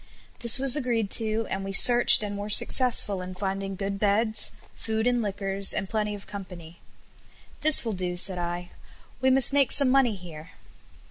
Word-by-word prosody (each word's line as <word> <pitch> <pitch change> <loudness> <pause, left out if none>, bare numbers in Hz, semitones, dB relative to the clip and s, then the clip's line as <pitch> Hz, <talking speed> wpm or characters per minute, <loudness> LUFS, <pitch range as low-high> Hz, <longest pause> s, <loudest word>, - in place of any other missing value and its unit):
This 235 +2 +2
was 270 0 +3
agreed 235 -7 -3
to, 220 0 +2
and 195 0 -6
we 195 - -8
searched 240 +2 +6
and 205 -1 -7
were 205 +1 -9
successful 215 -3 +2
in 185 0 -11
finding 195 0 -7
good 195 +1 -7
beds, 215 +2 0 0.2
food 220 0 -6
and 245 -1 -2
liquors, 195 -1 -3
and 195 - -6
plenty 210 0 -5
of 200 - -15
company. 180 -4 -13 0.8
"This 310 -4 +2
will 225 - -5
do," 180 -2 -7
said 180 0 -4
I; 175 0 -8 0.5
"we 260 - 0
must 265 +1 +6
make 280 -2 0
some 280 -2 +2
money 260 -5 -1
here." 170 -3 -15
205 Hz, 175 wpm, -23 LUFS, 190-235 Hz, 0.8 s, searched